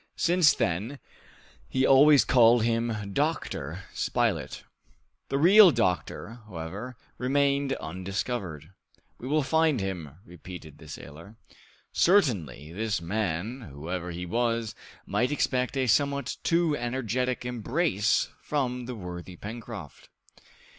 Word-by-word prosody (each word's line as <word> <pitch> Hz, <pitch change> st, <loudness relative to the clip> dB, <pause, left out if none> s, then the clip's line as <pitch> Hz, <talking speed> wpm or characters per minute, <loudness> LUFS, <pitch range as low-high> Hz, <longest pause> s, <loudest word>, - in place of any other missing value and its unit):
Since 175 Hz, -3 st, +4 dB
then, 100 Hz, +12 st, -1 dB, 0.7 s
he 130 Hz, 0 st, +1 dB
always 140 Hz, +1 st, +6 dB
called 120 Hz, -2 st, +5 dB
him 115 Hz, -3 st, -1 dB
Dr. 100 Hz, -, -2 dB
Spilett. -, -, -1 dB, 0.7 s
The 135 Hz, -, 0 dB
real 190 Hz, +6 st, +8 dB
doctor, 95 Hz, -, -1 dB
however, 100 Hz, +7 st, -7 dB, 0.2 s
remained 140 Hz, +1 st, +1 dB
undiscovered. 95 Hz, -, -4 dB, 0.5 s
"We 125 Hz, -, -7 dB
will 150 Hz, +2 st, +2 dB
find 160 Hz, -2 st, +2 dB
him!" 90 Hz, -7 st, -5 dB
repeated 85 Hz, -3 st, -11 dB
the 80 Hz, -, -13 dB
sailor. 80 Hz, +7 st, -10 dB, 0.6 s
Certainly, 95 Hz, -, +2 dB
this 105 Hz, 0 st, -1 dB
man, 100 Hz, +6 st, -2 dB
whoever 85 Hz, +5 st, -5 dB
he 90 Hz, +1 st, -5 dB
was, 115 Hz, +3 st, -1 dB, 0.3 s
might 125 Hz, +3 st, 0 dB
expect 130 Hz, -2 st, 0 dB
a 130 Hz, -, +2 dB
somewhat 140 Hz, +4 st, +1 dB
too 165 Hz, -2 st, +2 dB
energetic 125 Hz, 0 st, -2 dB
embrace 125 Hz, -, 0 dB
from 125 Hz, -4 st, -2 dB
the 125 Hz, -, -5 dB
worthy 90 Hz, -2 st, -8 dB
Pencroft! 110 Hz, -, -9 dB
115 Hz, 110 wpm, -27 LUFS, 90-135 Hz, 0.7 s, real